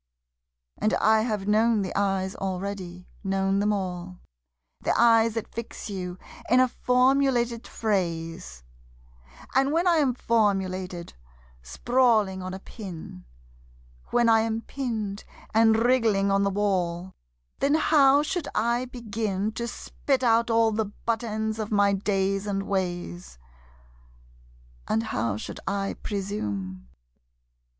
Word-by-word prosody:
And 215 - +2
I 220 0 +4
have 210 -4 -2
known 215 0 +3
the 185 - -5
eyes 195 -1 0
already, 185 -1 -5 0.2
known 195 0 +1
them 210 +1 +2
all 180 -2 -4 0.6
The - - 0
eyes 230 -1 +5
that 225 - -5
fix 230 -2 -6
you 180 -2 -5 0.3
in 250 +3 +5
a 255 - +5
formulated 250 -2 +2
phrase, 170 - -3 0.9
And 270 +2 +3
when 335 +3 +1
I 345 -2 +4
am 270 -5 +2
formulated, 190 -6 0 0.5
sprawling 215 - +2
on 185 0 -5
a 190 - -5
pin, 180 - -9 0.8
When 240 -1 +3
I 225 -1 +6
am 225 0 -1
pinned 220 -7 -4 0.3
and 225 0 +5
wriggling 225 -5 +2
on 195 0 +3
the 200 - +2
wall, 190 -3 -1 0.5
Then 285 +2 +3
how 290 -2 +5
should 345 0 -2
I 235 +3 +1
begin 220 -4 -3
To 235 +2 -4
spit 260 +2 -2
out 230 0 +3
all 225 -1 +3
the 220 0 0
butt 225 +3 -3
ends 220 0 -2
of 215 0 -4
my 200 -1 +3
days 195 0 0
and 195 -1 -1
ways? 175 - -3 1.5
And 225 - +1
how 115 - -2
should - - -7
I 195 0 -1
presume? 100 - -4
210 Hz, 125 wpm, -26 LUFS, 190-230 Hz, 1.5 s, I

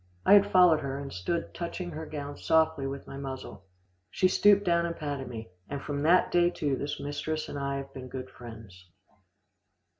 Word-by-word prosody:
I - - +7
had 205 0 +6
followed 180 -4 +6
her, 135 -1 -4
and 140 -1 -6
stood 130 - -3
touching 175 +1 -5
her 160 0 -6
gown 145 -1 -6
softly 160 -3 +2
with 140 0 -6
my 135 - -8
muzzle. 130 -8 -7 0.4
She 185 - +2
stooped 205 +2 +5
down 170 -1 +2
and 170 - -4
patted 145 -4 -4
me, 115 -5 -8 0.2
and 140 - -3
from 145 0 -4
that 170 +4 +4
day 175 0 +4
to 145 -5 -1
this 145 +2 -4
mistress 145 +2 -3
and 145 - -5
I 140 0 -2
have 135 0 -7
been 130 -1 -8
good 130 0 -7
friends. 110 -6 -12
145 Hz, 190 wpm, -29 LUFS, 135-170 Hz, 0.4 s, I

